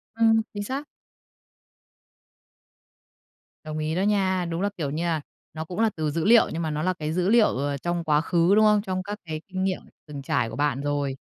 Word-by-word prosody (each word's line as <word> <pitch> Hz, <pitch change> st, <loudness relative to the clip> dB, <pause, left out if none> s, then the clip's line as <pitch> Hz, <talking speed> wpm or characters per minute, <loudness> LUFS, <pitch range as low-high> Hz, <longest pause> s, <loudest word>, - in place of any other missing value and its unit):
Ừm, 225 Hz, -1 st, +4 dB
chính 205 Hz, -, -4 dB
xác. 275 Hz, +7 st, -4 dB, 2.8 s
Đồng 155 Hz, 0 st, -5 dB
ý 155 Hz, +1 st, -2 dB
đó 185 Hz, -, 0 dB
nha. 190 Hz, -3 st, +1 dB
Đúng 170 Hz, +1 st, -3 dB
là, 200 Hz, -, +1 dB
kiểu 150 Hz, -5 st, -2 dB
như 160 Hz, +4 st, -2 dB
à, 165 Hz, -3 st, 0 dB, 0.3 s
nó 160 Hz, 0 st, -5 dB
cũng 180 Hz, +5 st, -6 dB
là 225 Hz, -1 st, +4 dB
từ 155 Hz, -2 st, -1 dB
dữ 165 Hz, +2 st, -1 dB
liệu, 230 Hz, +1 st, +6 dB
nhưng 165 Hz, -, -2 dB
mà 160 Hz, -, -1 dB
nó 150 Hz, +1 st, -2 dB
là 185 Hz, +1 st, +1 dB
cái 155 Hz, -3 st, -4 dB
dữ 180 Hz, +2 st, +1 dB
liệu, 225 Hz, -1 st, +6 dB
ờ, 140 Hz, +1 st, -1 dB
trong 175 Hz, +4 st, -2 dB
quá 150 Hz, -1 st, +2 dB
khứ, 170 Hz, +3 st, +3 dB
đúng 215 Hz, 0 st, +5 dB
không? 210 Hz, -1 st, +4 dB
Trong 185 Hz, -2 st, -3 dB
các 205 Hz, +2 st, -6 dB
cái 155 Hz, -1 st, -5 dB
kinh 190 Hz, -1 st, -3 dB
nghiệm 190 Hz, -1 st, -1 dB, 0.3 s
từng 145 Hz, -2 st, -7 dB
trải 120 Hz, -4 st, 0 dB
của 115 Hz, -, -7 dB
bạn 140 Hz, -1 st, 0 dB
rồi. 145 Hz, -2 st, -1 dB
170 Hz, 220 wpm, -25 LUFS, 155-200 Hz, 2.8 s, liệu